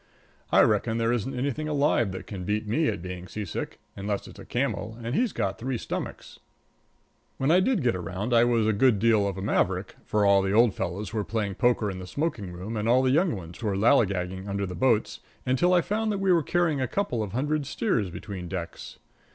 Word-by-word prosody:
I - - +6
reckon 110 - +2
there 115 0 +1
isn't 120 +2 -2
anything 140 +4 -2
alive 145 -8 +2
that 95 - -7
can 95 -4 -6
beat 105 +3 -1
me 150 +9 +1
at 85 - -2
being 90 0 -6
seasick, 105 -4 -5 0.2
unless 100 0 -3
it's - - -13
a - - -10
camel, 110 +2 -2
and 115 +1 -3
he's 235 - +1
got 95 +1 -2
three 125 +1 -2
stomachs. - - -6 1.0
When 135 +3 +2
I 180 - +6
did 210 - +1
get 120 -5 +2
around 95 +6 -3
I 115 0 +6
was 120 -2 +2
a 110 - +2
good 115 +1 +4
deal 110 -1 +3
of 95 -1 -4
a 95 - -4
maverick - - 0
for 105 -1 +1
all 100 -1 +5
the 95 0 -1
old 115 -1 +5
fellows 95 +4 -4
were 110 -2 0
playing 105 -2 -2
poker 115 -2 +1
in 95 - -7
the 90 - -8
smoking 115 - -3
room 95 +6 -5
and 105 +2 -1
all 130 +2 +5
the 130 - +3
young 165 +2 +3
ones 85 -3 -9
were 105 -4 -1
lallygagging 95 -4 +2
under 100 0 -1
the 90 - -6
boats 115 -1 +1 0.3
until 130 +8 +2
I 180 -1 +5
found 215 +4 -1
that 205 - -1
we 195 -1 +2
were 170 -2 +5
carrying 160 -2 +1
a 130 - 0
couple 160 - -1
of 105 -3 -4
hundred 145 +3 -1
steers 135 - 0
between 90 0 -7
decks. 85 -2 -6
110 Hz, 220 wpm, -27 LUFS, 100-135 Hz, 1.0 s, I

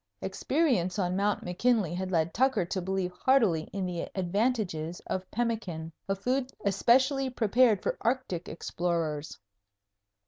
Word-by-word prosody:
Experience 250 - 0
on 180 -2 0
Mt. 205 +1 +1
McKinley 190 0 +1
had 185 +1 -3
led 165 -2 +1
Tucker 255 -7 +2
to 185 +2 -3
believe 190 0 -1
heartily 185 -6 +2
in 195 -1 -2
the 175 -2 -3
advantages 185 -4 -1
of 185 0 -4
pemmican, 210 -9 -2 0.2
a 195 - +2
food 250 +6 -1
especially 260 +7 +3
prepared 235 -2 +3
for - - -1
Arctic 235 -8 -1
explorers. 160 -3 -2
195 Hz, 130 wpm, -29 LUFS, 175-240 Hz, 0.2 s, especially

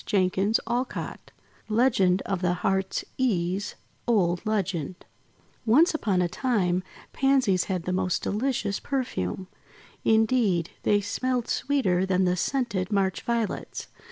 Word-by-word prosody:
Beats 195 +2 +2
(Adapted) 245 +3 -3 0.4
LEGEND 215 -5 +3
OF 195 -2 -2
THE 180 -1 +2
HEART'S 190 0 0
EASE 195 -5 0 0.3
Old 180 -7 +2
Legend 185 -6 -1 0.7
ONCE 315 +11 +5
upon 195 -12 +1
a - - +1
time, 185 -3 0 0.3
Pansies 260 -9 +2
had 185 -3 -2
the 185 - -2
most 185 -1 0
delicious 215 -2 -1
perfume. 190 - -3 0.6
Indeed, 220 -6 +2
they 205 0 +3
smelled 250 +4 -1
sweeter 215 -11 +1
than 185 0 +2
the 180 0 +2
scented 205 -2 -1
March 195 -2 +1
Violets. 235 -3 -3
200 Hz, 120 wpm, -26 LUFS, 185-240 Hz, 0.7 s, ONCE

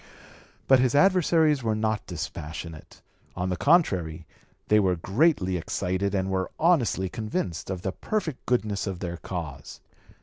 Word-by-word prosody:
But 135 -1 +6
his 125 +1 +2
adversaries 160 -4 +4
were 110 -2 0
not 110 0 -1
dispassionate; 80 -1 -7 0.3
on 90 +1 -2
the 90 - 0
contrary 90 - +2 0.4
they 105 - +5
were 95 -3 +2
greatly 95 - +1
excited 95 +4 -2
and 95 0 -1
were 95 -1 -1
honestly 140 - +2
convinced 95 -6 -4
of 95 -2 -4
the 95 - -1
perfect 165 - -3
goodness 105 -5 0
of 95 -2 -3
their 85 -1 -4
cause. 80 -6 -7
100 Hz, 140 wpm, -26 LUFS, 90-130 Hz, 0.4 s, But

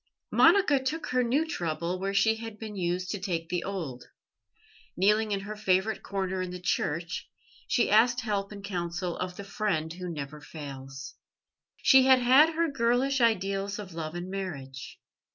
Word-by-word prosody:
Monica 295 -9 +5
took 310 +4 -3
her 255 0 +2
new 270 +7 +1
trouble 170 - -2
where 195 +1 -1
she 220 +3 +3
had 225 -1 -7
been 215 -1 -7
used 180 0 -2
to 205 - -3
take 170 -3 -3
the 180 -1 -1
old. 160 -11 -5 0.9
Kneeling 210 +3 +3
in 200 -1 0
her 210 +2 -6
favourite 210 +1 +1
corner 190 -1 -2
in 185 - -3
the 180 0 -6
church, 170 -1 -2 0.4
she 240 - +2
asked 240 +4 +5
help 205 -3 -2
and 200 -1 -9
counsel 175 -2 -3
of 180 0 -4
the 200 - -7
Friend 195 -6 -2
Who 180 0 -6
never 150 -2 -6
fails. 135 -2 -8 0.6
She 265 -1 +6
had 260 -1 +8
had 265 +6 +5
her 335 +1 +2
girlish 265 0 +1
ideals 200 -3 +1
of 195 -4 -8
love 160 0 -5
and 175 +1 -4
marriage. 140 -9 -6
195 Hz, 170 wpm, -28 LUFS, 175-225 Hz, 0.9 s, had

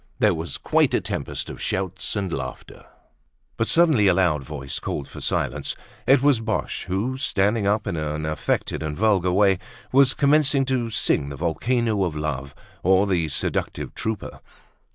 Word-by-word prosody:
There - - +3
was 80 -4 -5
quite - - +2
a - - +3
tempest - - -4
of - - -8
shouts 95 0 -2
and 95 -4 -2
laughter. 65 -3 -7 0.7
But 115 - -1
suddenly 155 -12 +4
a 90 - +4
loud 85 -7 +2
voice 65 +1 -5
called 70 - -4
for - - -10
silence. - - -1 0.3
It 135 0 +5
was 140 -5 +4
Boche 110 -1 -2
who, 105 +8 -2
standing 105 -3 +1
up 105 +1 +1
in - - -2
an 75 0 -3
affected 80 0 -1
and 75 -1 -4
vulgar 100 -4 +2
way, 95 -1 +3 0.3
was 135 0 +5
commencing 140 -1 +3
to 130 -3 -1
sing 70 -9 +1
"The 70 - -6
Volcano 110 - 0
of 85 -4 -2
Love, 70 -3 -4 0.3
or 95 +2 +4
the 90 -5 +1
Seductive - - -2
Trooper." 110 -2 -4
95 Hz, 165 wpm, -23 LUFS, 80-115 Hz, 0.7 s, It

